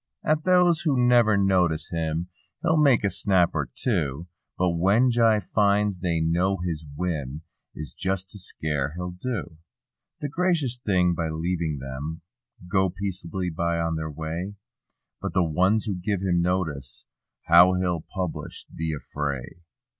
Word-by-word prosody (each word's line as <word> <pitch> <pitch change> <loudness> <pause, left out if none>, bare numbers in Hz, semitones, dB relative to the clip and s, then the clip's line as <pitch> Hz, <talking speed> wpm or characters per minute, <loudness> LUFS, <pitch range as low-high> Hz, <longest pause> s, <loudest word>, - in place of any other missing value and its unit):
At 155 +1 +1
those 180 -2 +4
who 145 -6 +1
never 120 -4 +5
notice 90 -5 +2
him 80 +1 -2 0.3
he'll 160 - +3
make 135 -7 +4
a 100 - +2
snap 95 -4 +3
or 70 -5 -2
two. 80 - -1 0.3
But 90 -1 +2
when 100 +9 +3
Jie 115 -2 +4
finds 100 0 +2
they 85 -2 0
know 85 +4 +1
his 85 -3 -3
whim 75 -4 -3 0.3
is 75 -3 -6
just 95 +1 -2
to 105 - -7
scare 75 -4 -3
he'll 90 0 -4
do 90 - -5 0.6
The 145 - -2
gracious 160 -6 0
thing 90 -3 +3
by 85 -1 -2
leaving 80 -1 -2
them 70 +5 -6 0.5
go 95 0 +2
peace'bly 90 -2 -3
on 85 0 0
their 80 0 -3
way; 80 +6 -5 0.7
But - - -3
the 90 - +3
ones 95 +7 +2
who 105 - -1
give 95 +1 -2
him 90 -2 +2
notice—^how 85 +1 +1
he'll 90 -3 0
publish 90 -3 -4
the 80 -1 -2
affray. 70 0 -5
90 Hz, 145 wpm, -25 LUFS, 80-100 Hz, 0.7 s, never